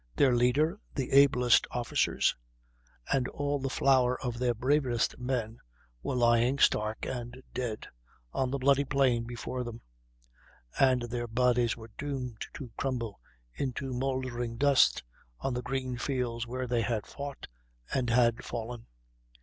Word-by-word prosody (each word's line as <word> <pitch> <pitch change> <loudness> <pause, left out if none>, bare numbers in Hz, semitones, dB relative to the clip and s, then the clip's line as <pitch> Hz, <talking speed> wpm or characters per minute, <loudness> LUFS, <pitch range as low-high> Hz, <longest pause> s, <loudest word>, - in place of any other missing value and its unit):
Their 130 -3 +4
leader, 145 +10 +2 0.2
the 135 -3 -2
ablest 135 -3 +5
officers, 120 -1 +1 0.8
and 130 -2 +2
all 145 0 -2
the 135 0 -2
flower 130 -2 +3
of 120 -2 -4
their 125 -1 +1
bravest 130 -1 +1
men 125 -3 -2 0.4
were - - -2
lying, 120 +2 +3
stark 110 -4 +2
and 125 0 -6
dead, 120 -4 -3 0.5
on 130 - 0
the 140 - -1
bloody 140 +1 +3
plain 130 -4 +2
before 120 +1 -4
them; 120 -1 -7 1.0
and 130 -2 +4
their 120 0 -3
bodies 120 0 +2
were 110 -1 -11
doomed 130 -5 -4
to 130 -5 -8
crumble 120 -6 -3 0.3
into 130 - -3
mouldering 125 -2 -2
dust 140 - +4 0.4
on 130 - -2
the 125 - -2
green 130 -1 -3
fields 120 -3 -2
where 130 +1 -3
they 120 -1 0
had 110 -1 -1
fought 140 -1 -7 0.5
and 130 -3 0
had 115 -1 +3
fallen. 120 0 -6
125 Hz, 140 wpm, -30 LUFS, 120-135 Hz, 1.0 s, ablest